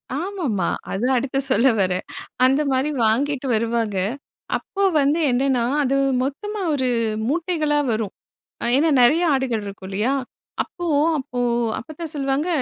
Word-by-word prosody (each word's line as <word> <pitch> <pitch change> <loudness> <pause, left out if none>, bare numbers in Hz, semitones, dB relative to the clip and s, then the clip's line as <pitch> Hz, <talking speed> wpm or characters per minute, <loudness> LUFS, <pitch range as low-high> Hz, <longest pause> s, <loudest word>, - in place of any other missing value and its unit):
ஆமா, 370 +5 -4
ஆமா. 190 -5 0 0.2
அதுதான் 250 +7 +1
அடுத்து 270 +1 -2
சொல்ல 260 0 +4
வரேன். 185 -1 0 0.4
அந்தமாரி 270 +1 +2 0.2
வாங்கிட்டு 270 +5 +1
வருவாங்க. 225 -2 -1 0.6
அப்போ 395 - -4 0.2
வந்து 290 +3 +2
என்னன்னா 255 -1 +1 0.2
அது 270 0 +1 0.3
மொத்தமா 415 +10 -4
ஒரு 260 -3 0 0.4
மூட்டைகளா 310 -2 0
வரும். 215 -3 -2 0.5
அ - - -1
ஏன்னா 315 +4 +3
நிறைய 300 +8 +5
ஆடுகள் 255 -5 -1
இருக்கும் 195 -1 -8
இல்லயா! 215 +7 0 0.5
அப்போ 350 -1 -7 0.3
அப்போ 250 -2 -4 0.4
அப்பத்தா 310 +6 -8
சொல்லுவாங்க, 275 +3 -1
270 Hz, 130 wpm, -22 LUFS, 230-295 Hz, 0.6 s, நிறைய